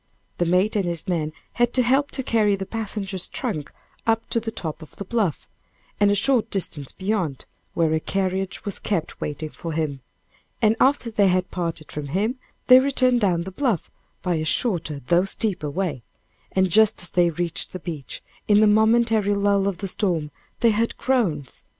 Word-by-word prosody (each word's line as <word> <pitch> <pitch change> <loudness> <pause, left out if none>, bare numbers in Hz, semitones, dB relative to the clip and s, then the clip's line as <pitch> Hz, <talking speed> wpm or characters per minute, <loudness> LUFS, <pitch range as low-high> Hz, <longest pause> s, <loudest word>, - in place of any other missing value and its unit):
The 175 - +2
mate 185 +5 +2
and 205 - +2
his 170 +1 -4
man 160 -4 -1 0.2
had 240 0 +1
to 255 - +4
help 270 +4 +2
to 265 - -2
carry 215 -4 +2
the 195 0 -5
passenger's 200 -3 -3
trunks 150 -2 -3 0.4
up 225 0 +1
to 230 - +2
the 225 0 -4
top 165 -7 -5
of 155 - -13
the 200 - -7
bluff, 200 -7 -1 0.5
and 205 0 +5
a 205 - +3
short 230 +2 +2
distance 155 -9 -2
beyond, 185 -9 -2 0.3
where 165 -2 +2
a 160 - +2
carriage 190 +2 -2
was 200 - -3
kept 170 -6 -3
waiting 150 +1 -4
for 165 -1 -6
him, 150 -4 -2 0.6
and 220 -1 +3
after 265 -3 +3
they 205 -2 +3
had 185 0 +1
parted 165 -3 -4
from 150 -1 -5
him, 210 - -1 0.3
they 255 0 +9
returned 255 -2 +2
down 175 -4 +2
the 190 - -7
bluff 225 - -1 0.3
by 180 -3 +1
a 155 - -1
shorter 155 - 0
though 175 +6 +3
steeper 195 -6 -1
way; 155 -5 -2 0.5
and 190 -1 +2
just 215 0 +4
as 175 - -4
they 175 -1 +3
reached 170 0 -3
the - - -5
beach, 160 -6 -7 0.2
in 205 -1 +5
the 215 - +6
momentary 220 -1 +3
lull 200 -1 +2
of 195 -3 -1
the 195 - -4
storm, 175 -6 -1 0.3
they 230 -1 +5
heard 225 +2 0
groans. 180 - 0
195 Hz, 185 wpm, -23 LUFS, 170-220 Hz, 0.6 s, they